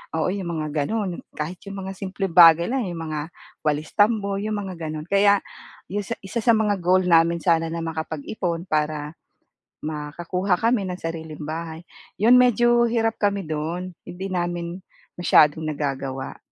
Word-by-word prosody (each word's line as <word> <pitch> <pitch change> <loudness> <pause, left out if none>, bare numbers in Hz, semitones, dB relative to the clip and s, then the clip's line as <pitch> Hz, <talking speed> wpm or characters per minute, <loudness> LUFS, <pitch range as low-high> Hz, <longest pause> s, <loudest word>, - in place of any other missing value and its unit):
oo, 160 +2 +1
yung 190 -3 -4
mga 150 -1 -1
gano'n. 200 -2 -2 0.2
Kahit 160 +4 -4
yung 195 0 -6
mga 190 0 -5
simpleng 195 0 -3
bagay 170 -1 +8
lang 255 -2 0
eh, 175 - -4
yung 165 - -6
mga 155 +2 -4 0.3
walis-tambo, 200 +7 +1
yung 215 +1 -2
mga 190 -2 -6
gano'n. 155 0 -5
Kaya 200 0 +4 0.5
yung 205 +2 -3
sa 230 - -3
isa 195 +5 -5
sa 235 - +5
mga 210 -2 +1
goal 185 +1 +3
namin 165 0 +4
sana 165 -1 +3
na 165 0 -3
makapag-ipon 165 +2 -3
para 150 0 -1 0.7
makakuha 170 +5 -2
kami 230 -2 +2
ng 180 - -4
sariling 160 -2 -6
bahay. 160 +1 -5 0.4
'Yon 235 +4 +7
medyo 240 0 +4
hirap 225 -1 0
kami 200 -1 +1
dun, 165 +4 -3
hindi 185 +2 -6
namin 175 0 -3 0.4
masyadong 160 -2 +4
nagagawa. 135 -3 -4
175 Hz, 155 wpm, -23 LUFS, 160-200 Hz, 0.7 s, bagay